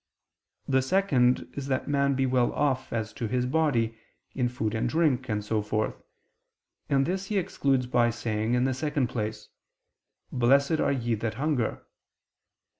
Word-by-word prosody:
The 130 -1 +3
second 130 -5 +2
is 140 -1 -5
that 130 -1 -1
man 140 -1 +2
be 135 0 +1
well 125 -2 +2
off 135 -3 0
as 110 -2 -3
to 115 - -3
his 125 +3 0
body, 125 -6 +1 0.3
in 125 -2 0
food 110 -3 -2
and 115 +2 0
drink, 135 -4 +1
and 105 -1 -2
so 110 0 0
forth; 110 +1 -2 0.9
this 175 +8 +1
he 210 - -1
excludes 135 -7 +1
by 120 -1 +2
saying 115 0 -1
in 125 - +2
the 130 0 +1
second 145 -1 -1
place: 105 -2 -4 0.8
"Blessed 140 +5 +3
are - - +2
ye 120 -4 -1
that 110 0 -2
hunger." 140 -5 -1
125 Hz, 155 wpm, -27 LUFS, 115-140 Hz, 0.9 s, The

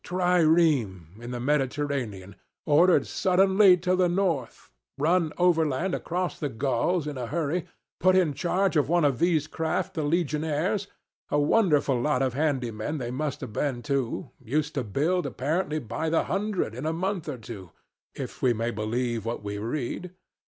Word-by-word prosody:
trireme 160 - +2
in 120 - -7
the 125 -1 -4
Mediterranean, 130 -7 -2 0.3
ordered 165 +4 +4
suddenly 190 0 +4
to 180 +1 +1
the 180 -1 +2
north; 175 -9 -2 0.3
run 160 +2 +2
overland 170 -1 +2
across 180 +1 -2
the 145 - -2
Gauls 135 +7 0
in 145 -3 -5
a 120 - -3
hurry; 165 +4 -2 0.3
put 185 0 +4
in 175 -6 +3
charge 185 +5 0
of 145 -2 +2
one 170 -2 +3
of 135 -4 +1
these 165 -4 +2
craft 160 0 -2
the 160 - -2
legionaries, 160 +4 0 0.4
a - - +1
wonderful 145 - +3
lot 135 -1 +1
of 130 -2 0
handy 135 -4 0
men 110 +9 -4
they 120 -3 -4
must 145 +2 -3
have 125 -5 -7
been 130 -3 -2
too 135 -5 -2
used 150 +6 -1
to 135 - -1
build, 150 - 0
apparently 150 +5 -1
by 125 +4 -3
the 165 - +2
hundred, 195 - -2
in 130 +6 -4
a - - +1
month 180 -1 -2
or 140 - -4
two, 105 -6 -9 0.5
if - - -7
we 125 -2 +3
may 115 +1 -2
believe 115 +1 -2
what 115 -1 -4
we 100 0 -4
read. 125 - -3
150 Hz, 165 wpm, -26 LUFS, 125-175 Hz, 0.5 s, ordered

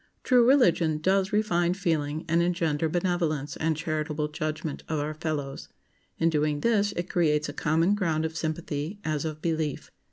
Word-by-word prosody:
True 250 -2 +5
religion 175 - +4
does 190 +5 +1
refine 180 -5 +1
feeling 160 -5 -1
and 165 +1 +3
engender 165 -3 0
benevolence 170 -4 -1
and 160 -1 0
charitable 155 -1 -2
judgment 155 -1 -4
of 160 - 0
our 150 +1 -2
fellows. 150 -3 -4 0.5
In 165 0 +2
doing 150 -1 0
this, 205 -3 +2
it 175 +1 -3
creates 155 -4 +1
a - - -6
common 165 +5 +2
ground 165 -6 0
of 160 0 -4
sympathy, 160 +2 -3
as 155 -1 -1
of 155 -1 -5
belief. 160 -4 -2
160 Hz, 160 wpm, -27 LUFS, 155-175 Hz, 0.5 s, True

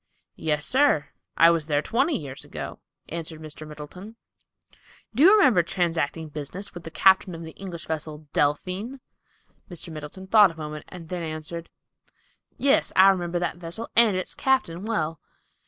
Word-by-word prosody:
"Yes, 150 -1 0
sir; 265 - +3 0.3
I 165 0 +7
was 165 -2 -1
there 145 -1 +1
twenty 270 +8 +1
years 140 -3 -7
ago," - - -7 0.3
answered 160 -1 -5
Mr. 155 0 -9
Middleton. 155 +8 -10 1.0
"Do 245 - 0
you 370 - +9
remember 260 - +5
transacting 165 -2 -1
business 155 +7 -5
with 175 -2 -9
the - - -5
captain 190 +1 +4
of 165 - -8
the 160 - -8
English 170 -2 -8
vessel 155 -1 -5
'Delphine'?" 185 - 0 0.7
Mr. 170 -2 -6
Middleton 155 +5 -8
thought 205 0 +7
a 165 - -12
moment 150 -1 -6
and 170 -3 -10
then 180 -1 -3
answered, 160 +1 -6 0.9
"Yes, 280 +1 +3
I 190 +1 +8
remember 175 -2 0
that 175 0 -2
vessel 175 +6 -7
and 220 -5 +5
its 185 - -3
captain 205 -9 0
well." 165 -8 -1
170 Hz, 155 wpm, -25 LUFS, 155-195 Hz, 1.0 s, you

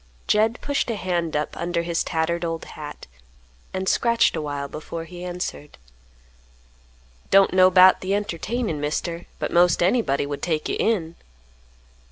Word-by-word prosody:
Jed 220 +3 +2
pushed 285 -3 -1
a 230 - -1
hand 175 -4 -2
up 150 0 -2
under 170 0 -2
his 170 -1 -1
tattered 165 +1 -1
old 165 -1 -3
hat, 150 -1 -9 0.7
and 190 0 -3
scratched 235 -2 +3
awhile 145 -3 -3
before 155 +3 -7
he 175 +1 -10
answered, 175 -4 -6 1.5
"Don't 195 -1 +5
know 185 0 +6
'bout 185 0 +6
th' - - -8
entertainin', 205 -2 -2
Mister, 165 +3 -3
but - - -3
'most 175 0 +4
anybody 180 - +1
would 145 0 -5
take 160 -3 -1
you - - -1
in." 170 -7 0
175 Hz, 145 wpm, -23 LUFS, 160-190 Hz, 1.5 s, know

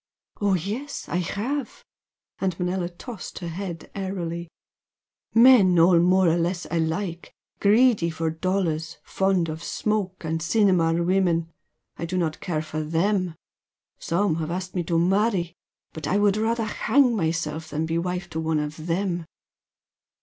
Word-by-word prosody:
"Oh, 200 -2 +3
yes, 215 - -4
I - - 0
have!" 250 - -3 0.5
and 185 -3 -1
Manella 180 0 -1
tossed 205 +4 -9
her 175 - -5
head 170 0 -6
airily 175 -4 -4 0.9
"Men 230 -7 +7
all 170 +1 +6
more 185 +1 +4
or 165 +1 +3
less 175 +1 -1
alike 170 +2 -2 0.3
greedy 210 -3 +4
for 160 0 -2
dollars, 165 -2 -1
fond 190 -3 +1
of 160 +1 -6
smoke 205 -4 -2
and 160 0 -2
cinema 180 -2 +3
women, 170 -2 +1 0.5
I 170 - -3
do 185 +2 -2
not 160 -3 -1
care 155 -3 -2
for 155 0 -4
them. 175 +3 0 0.6
Some 170 -1 0
have 160 -1 -3
asked 185 +1 -4
me 180 - 0
to 165 0 +1
marry, 185 0 +1 0.4
but 155 -2 -5
I 195 - +2
would 205 -1 +3
rather 225 +1 0
hang 250 +3 +2
myself 160 -3 -2
than 155 +2 -2
be 165 +1 -1
wife 180 +1 -3
to 160 - -3
one 160 -1 0
of 150 +2 -4
them!" 175 -1 -1
175 Hz, 150 wpm, -25 LUFS, 165-195 Hz, 0.9 s, Men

